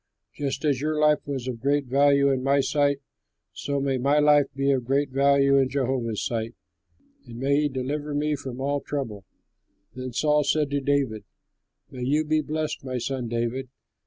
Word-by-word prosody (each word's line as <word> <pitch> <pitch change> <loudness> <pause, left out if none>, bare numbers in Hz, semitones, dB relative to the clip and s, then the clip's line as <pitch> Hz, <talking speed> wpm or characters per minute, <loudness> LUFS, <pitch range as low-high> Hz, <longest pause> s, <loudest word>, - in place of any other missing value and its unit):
Just 140 +1 -3
as 140 -3 +1
your 155 +1 -1
life 150 0 +4
was 135 -3 -4
of 125 -3 -4
great 140 +3 +1
value 140 +1 +4
in 130 -1 0
my 140 +2 +2
sight 140 0 +1 0.5
so 140 0 -2
may 135 -1 0
my 140 +4 +2
life 150 -1 +5
be 135 0 +1
of 130 -2 +1
great 135 +2 0
value 140 0 +4
in 135 -1 +2
Jehovah's 130 -5 -1
sight, 115 0 -3 0.7
and 115 -1 -9
may 140 +3 +2
he 150 - +1
deliver 145 +3 -3
me 150 +1 0
from 130 -3 -7
all 140 +1 -1
trouble." 115 -11 -5 0.7
Then 130 0 -6
Saul 150 +4 +2
said 145 0 +1
to 140 0 0
David, 135 -6 0 0.7
"May 125 - -8
you 145 +5 +1
be 155 0 +1
blessed, 155 0 -3
my 130 -1 -3
son 125 0 -3
David! 120 +3 -2
140 Hz, 180 wpm, -25 LUFS, 130-145 Hz, 0.7 s, life